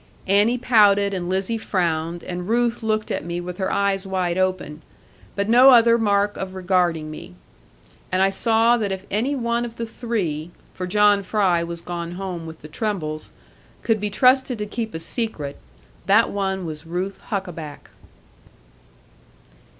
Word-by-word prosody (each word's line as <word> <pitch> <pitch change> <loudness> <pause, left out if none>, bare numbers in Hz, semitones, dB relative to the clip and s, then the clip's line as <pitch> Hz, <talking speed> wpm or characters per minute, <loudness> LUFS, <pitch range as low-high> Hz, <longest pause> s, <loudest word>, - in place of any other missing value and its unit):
Annie 205 +5 +3
pouted, 205 -5 +4
and 180 -2 -3
Lizzie 195 +5 -1
frowned, 170 -4 -1
and 180 +1 -5
Ruth 235 0 +1
looked 215 -1 -1
at - - -2
me 170 +1 -4
with 180 +1 -7
her 190 - -1
eyes 200 -1 0
wide 185 -2 -1
open, 185 -5 -1 0.5
but 200 0 -1
no 250 +4 +7
other 235 -2 +7
mark 205 -1 +1
of 190 0 -5
regarding 175 -4 0
me. 120 -11 -10 0.8
And 185 - +1
I 195 - +3
saw 230 +3 +3
that 210 -4 -2
if 190 0 -5
any 245 +8 0
one 235 -2 -1
of 235 -1 -6
the 230 - -4
three 195 -10 -3 0.2
(for 185 - -5
John 205 +1 +4
Fry 185 -3 +1
was 170 0 -6
gone 170 -1 -5
home 180 -3 -5
with 160 0 -10
the 155 - -9
trembles) 155 -4 -4 0.5
could 225 -2 +1
be 210 - -1
trusted 255 +3 +3
to 210 - -3
keep 220 0 -5
a - - -3
secret, 165 - -4 0.5
that 220 +4 +4
one 190 -2 -2
was 155 0 -7
Ruth 185 +4 -3
Huckaback. 170 -8 -5
195 Hz, 160 wpm, -22 LUFS, 175-220 Hz, 0.8 s, no